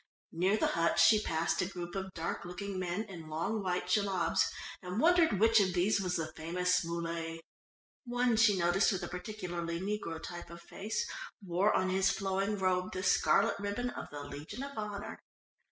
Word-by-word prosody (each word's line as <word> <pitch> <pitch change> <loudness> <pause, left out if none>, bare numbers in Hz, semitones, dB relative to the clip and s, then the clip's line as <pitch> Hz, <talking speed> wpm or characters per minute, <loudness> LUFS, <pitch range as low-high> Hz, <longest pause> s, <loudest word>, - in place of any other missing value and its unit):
Near 185 +5 +2
the - - +2
huts 170 0 +3
she 215 +4 +6
passed 165 0 0
a 180 - 0
group 175 -2 -6
of 190 -1 -4
dark 165 0 -3
looking 185 +2 -5
men 180 +3 -2
in 175 -7 -10
long 170 +8 -1
white 180 -1 -1
jellabs, 190 -2 +2 0.3
and 180 +3 -4
wondered 330 - +4
which 225 +1 +6
of 190 -2 +2
these 195 +3 +2
was 180 -1 -1
the 160 -1 -3
famous 180 +3 +1
Muley. 165 -1 -3 0.7
One 245 -1 +2
she 220 -3 +5
noticed 175 +4 +3
with 190 -3 -2
a - - -3
particularly 175 -3 -4
negro 190 -4 -3
type 175 +1 -8
of 170 0 -9
face, 210 - -3 0.4
wore 185 +4 +2
on 185 0 +2
his 190 0 +3
flowing 195 +1 0
robe 185 -1 0
the 185 - -3
scarlet 200 +2 +3
ribbon 205 +5 -2
of - - -7
the 145 -1 -7
Legion 145 - -7
of 280 0 -7
Honour. 210 -1 -5
185 Hz, 180 wpm, -32 LUFS, 170-210 Hz, 0.7 s, she